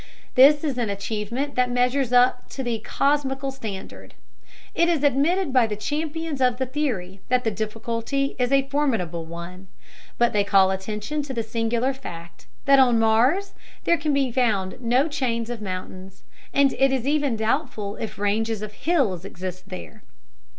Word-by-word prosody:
This 285 +4 +6
is 275 -5 -1
an 230 -3 0
achievement 215 +7 -3
that 250 0 +2
measures 250 +1 +1
up 250 0 +3
to 265 - -5
the 235 -2 -1
cosmical 275 0 0
standard. 220 -8 -8 0.6
It 340 0 +3
is 320 -4 +1
admitted 290 +4 +2
by 250 -3 +4
the 210 - -3
champions 300 +5 -3
of 250 -1 +3
the 260 - -1
theory 230 -10 -3
that 250 0 +2
the 225 - 0
difficulty 230 +6 -2
is 250 +1 +1
a 275 0 +3
formidable 225 - -1
one; 170 +3 -9 0.5
but 240 0 +2
they 205 -1 +3
call 195 -1 +4
attention 210 +10 -3
to 275 -2 -6
the 230 - -1
singular 230 +3 0
fact 170 -10 -10 0.2
that 275 -1 +6
on 245 -3 +5
Mars 240 - +2 0.3
there 340 - +4
can 300 0 0
be 275 -3 +1
found 220 -5 0
no 250 +5 +2
chains 245 -6 -2
of 235 -3 -6
mountains, 185 -1 -7 0.3
and 280 -1 +3
it 270 0 +4
is 260 -2 -1
even 285 -4 +1
doubtful 220 -2 -1
if 220 - -6
ranges 215 +1 0
of 210 0 -7
hills 230 - 0
exist 185 -1 -7
there. 210 +3 -9
240 Hz, 165 wpm, -24 LUFS, 210-275 Hz, 0.6 s, This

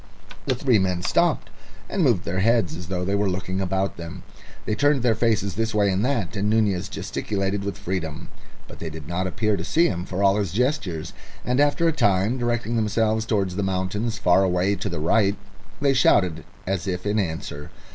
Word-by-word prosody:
The 130 - +2
three 125 -3 +3
men 90 -2 0
stopped, - - +1 0.4
and 195 - -2
moved 115 - +3
their 90 +2 -1
heads 110 -4 +2
as 85 0 -7
though 90 0 -2
they 100 - -1
were 100 0 +1
looking 95 +1 -2
about 95 +1 -1
them. 85 -1 -8 0.4
They - - -1
turned 145 +2 +2
their 120 -2 +4
faces 110 -4 +1
this 115 +3 -2
way 100 -2 +3
and 95 +2 0
that, 120 -7 -1
and 100 +1 0
Nunez 100 -4 +1
gesticulated 100 -1 -2
with 100 0 -4
freedom. 85 -6 -4 0.4
But - - -12
they 80 - -4
did 80 -2 -9
not 90 +3 -1
appear 110 +3 0
to 85 - -4
see 165 - +3
him 90 - -1
for 95 +2 -2
all 100 +1 +4
his 100 -5 -1
gestures, 115 - -1 0.3
and 125 +2 +1
after 145 +3 +3
a - - +4
time, 110 -2 +2
directing 120 -1 -1
themselves 110 0 +1
towards 100 -5 0
the - - 0
mountains 95 +4 -1
far 90 0 +4
away 95 +1 +2
to 95 - -3
the 85 - -4
right, 100 +5 +2 0.4
they 140 -1 +3
shouted 90 - +3 0.2
as 95 0 -2
if 90 0 -3
in 105 +1 +1
answer. 80 -5 -4
100 Hz, 200 wpm, -24 LUFS, 90-115 Hz, 0.4 s, their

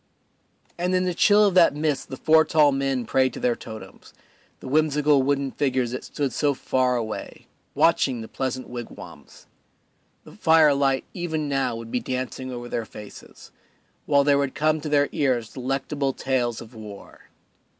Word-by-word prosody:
And 180 +1 0
in 185 0 +1
the 180 - 0
chill 205 +4 +5
of 200 - +2
that 175 -5 +5
mist 150 -2 -2
the 130 - -6
four 160 +2 +5
tall 150 -3 +4
men 135 -2 -1
prayed 130 +3 +1
to - - -7
their 120 -1 +1
totems, 110 -1 -11 0.4
the - - -10
whimsical 150 0 +3
wooden 140 0 0
figures 130 -4 -1
that 125 - -5
stood 140 -3 -3
so 145 -2 +1
far 130 0 0
away, 110 -3 -5 0.3
watching 135 -7 +2
the 110 - -8
pleasant 130 0 -4
wigwams; 120 -1 -10 0.8
the - - -14
firelight 140 -4 +3
even 160 -4 -3
now 135 -4 0
would 115 0 -8
be 125 - 0
dancing 130 +1 -4
over 120 -1 -6
their 115 - -3
faces, 105 -1 -13 0.6
while 140 -1 +4
there 140 0 +3
would 140 -1 -2
come 155 0 +1
to 150 - -5
their 145 -1 +3
ears 125 -5 -1
delectable 135 +2 -2
tales 125 -4 -1
of 115 +1 -12
war. 105 -3 -12
135 Hz, 165 wpm, -24 LUFS, 125-150 Hz, 0.8 s, chill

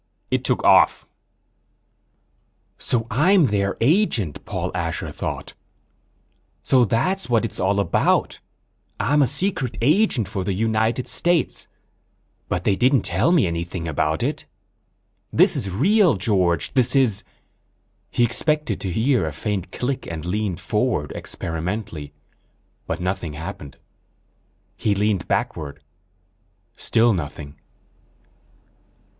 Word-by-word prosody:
It - - +1
took - - +1
off." - - +5 1.7
_So 115 -3 0
I'm 170 - +4
their 100 -4 0
agent, 120 - +1
Paul - - -3
Asher 85 -2 -3
thought. - - -5 1.1
So 125 -2 +4
that's 185 - 0
what 115 -1 +2
it's 110 - -5
all 100 +2 +1
about. 100 -4 +1 0.6
I'm 145 +8 +2
a 135 - +4
secret 155 - -1
agent 145 - +3
for 100 -2 -3
the 95 - -1
United 110 +3 0
States, 175 -2 0 0.8
but 90 - -1
they 100 - +2
didn't 130 +5 +3
tell 170 - +2
me 175 - +4
anything 85 0 -3
about 80 0 -1
it. - - -2 0.9
This - - +5
is 100 - -2
real 180 - +3
George, 90 -5 0
this 130 -1 +2
is... 125 -8 +2 0.9
He 120 - +1
expected 150 0 0
to 95 - -3
hear 115 - +1
a - - -3
faint 95 +5 -4
click 130 +1 -3
and 80 -1 -6
leaned 100 -1 -2
forward - - -1
experimentally, 85 -2 -4 0.8
but - - -3
nothing 90 -3 -3
happened. 75 -2 -8 1.0
He 105 -2 0
leaned 105 -2 0
backward. 70 -3 -2 1.0
Still 115 0 +2
nothing. 75 -4 -6
105 Hz, 115 wpm, -22 LUFS, 90-130 Hz, 1.7 s, off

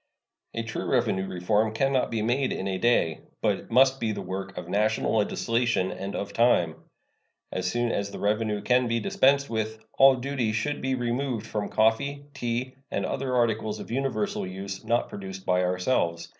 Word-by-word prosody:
A - - -1
true - - -4
revenue 95 0 +1
reform 105 +5 0
can 135 +4 +1
not 130 - +2
be 110 -2 -1
made 125 +4 +1
in 95 - -3
a 95 -1 -2
day, 115 -10 +2 0.2
but - - -1
must 135 +2 +5
be 115 -2 0
the - - -4
work 95 +1 -5
of 90 -1 -6
national 105 +4 +1
legislation 115 -1 +1
and 100 +1 -5
of 100 0 -4
time. 100 -9 +3 0.8
As 90 0 -1
soon 120 +2 0
as 100 0 -1
the - - -8
revenue 105 0 0
can 125 +2 +3
be 115 0 +1
dispensed 140 +5 +3
with, 110 -1 -2 0.2
all 135 0 +8
duty 125 -3 -1
should 145 +7 -1
be 130 0 0
removed 120 -1 -2
from 105 -2 -3
coffee, 140 +6 +1
tea 125 0 -2 0.2
and - - -1
other 130 -1 -2
articles 110 -3 +1
of - - -8
universal 120 -7 -1
use 95 +1 -6
not 120 +1 +1
produced 95 -1 -8
by 90 0 +2
ourselves. 90 -2 0
110 Hz, 180 wpm, -27 LUFS, 100-125 Hz, 0.8 s, all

